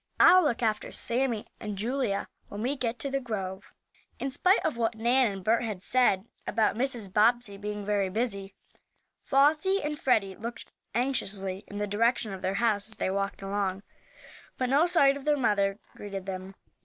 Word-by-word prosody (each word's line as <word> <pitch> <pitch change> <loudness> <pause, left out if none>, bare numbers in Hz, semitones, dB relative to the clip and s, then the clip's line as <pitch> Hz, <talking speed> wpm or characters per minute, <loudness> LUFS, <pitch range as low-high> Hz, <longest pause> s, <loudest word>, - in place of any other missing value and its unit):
"I'll 370 +1 +8
look 245 -5 0
after 215 -2 0
Sammie 235 -2 0
and 210 -3 -5
Julia 225 -1 -1 0.2
when 205 +2 -5
we 265 +4 0
get 245 -3 -2
to 275 - -4
the 275 - 0
grove." 195 -6 -5 0.5
In 270 - -3
spite 365 +8 +3
of 315 - 0
what 230 -1 0
Nan 240 +1 +3
and 195 -1 -7
Bert 225 +4 +2
had 210 -5 -4
said 220 -6 +3 0.2
about 220 -2 +1
Mrs. 235 -6 -3
Bobbsey 225 0 +3
being 205 0 -5
very 200 -2 +1
busy, 200 -2 -2 0.7
Flossie 305 +8 +3
and 295 0 -3
Freddie 200 -7 +2
looked 235 +3 -7 0.2
anxiously 200 -7 -1
in 205 - -8
the 205 - -1
direction 220 +1 +1
of 190 - -7
their 190 - -1
house 215 -2 +1
as 220 - -9
they 190 - -1
walked 195 0 -2
along. 195 -1 -2 0.7
But 255 -1 -1
no 295 +5 +4
sight 280 -6 +5
of 280 - -11
their 300 -1 +3
mother 200 -5 +1 0.2
greeted 195 -2 -6
them. 190 0 -6
220 Hz, 180 wpm, -28 LUFS, 200-255 Hz, 0.7 s, I'll